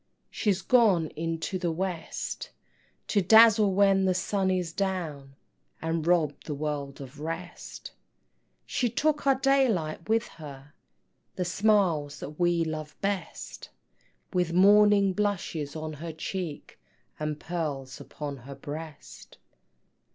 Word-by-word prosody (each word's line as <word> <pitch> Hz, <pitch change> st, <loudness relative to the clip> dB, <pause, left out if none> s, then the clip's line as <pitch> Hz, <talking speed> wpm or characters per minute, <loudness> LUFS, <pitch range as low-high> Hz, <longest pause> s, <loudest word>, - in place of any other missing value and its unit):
She's 195 Hz, -3 st, 0 dB
gone 200 Hz, -10 st, +4 dB
into 165 Hz, +4 st, -3 dB
the 175 Hz, -2 st, 0 dB
West, 175 Hz, 0 st, -4 dB, 0.6 s
To 205 Hz, -, +3 dB
dazzle 220 Hz, +1 st, +7 dB
when 195 Hz, 0 st, +4 dB
the 185 Hz, -1 st, +2 dB
sun 190 Hz, +1 st, 0 dB
is 180 Hz, -3 st, -1 dB
down, 165 Hz, -9 st, -3 dB, 0.4 s
And 165 Hz, 0 st, -2 dB
rob 165 Hz, -5 st, +2 dB
the 150 Hz, -, -4 dB
world 145 Hz, -2 st, -4 dB
of 140 Hz, +1 st, -10 dB
rest: 165 Hz, +3 st, -6 dB, 0.7 s
She 245 Hz, -, 0 dB
took 300 Hz, +4 st, 0 dB
our 270 Hz, -, +6 dB
daylight 230 Hz, -, +1 dB
with 225 Hz, +1 st, +2 dB
her, 145 Hz, -2 st, -11 dB, 0.6 s
The 180 Hz, -, -1 dB
smiles 180 Hz, -7 st, +2 dB
that 150 Hz, +3 st, -8 dB
we 175 Hz, -1 st, +3 dB
love 155 Hz, -1 st, -6 dB
best, 200 Hz, -1 st, -4 dB, 0.6 s
With 180 Hz, -2 st, +1 dB
morning 200 Hz, +1 st, +6 dB
blushes 175 Hz, -8 st, -2 dB
on 155 Hz, 0 st, -4 dB
her 165 Hz, +3 st, -6 dB
cheek, 165 Hz, -1 st, -5 dB, 0.4 s
And 150 Hz, -1 st, -3 dB
pearls 145 Hz, -7 st, -4 dB
upon 145 Hz, -2 st, -6 dB
her 135 Hz, +2 st, -10 dB
breast. 150 Hz, +1 st, -9 dB
170 Hz, 120 wpm, -28 LUFS, 150-200 Hz, 0.7 s, dazzle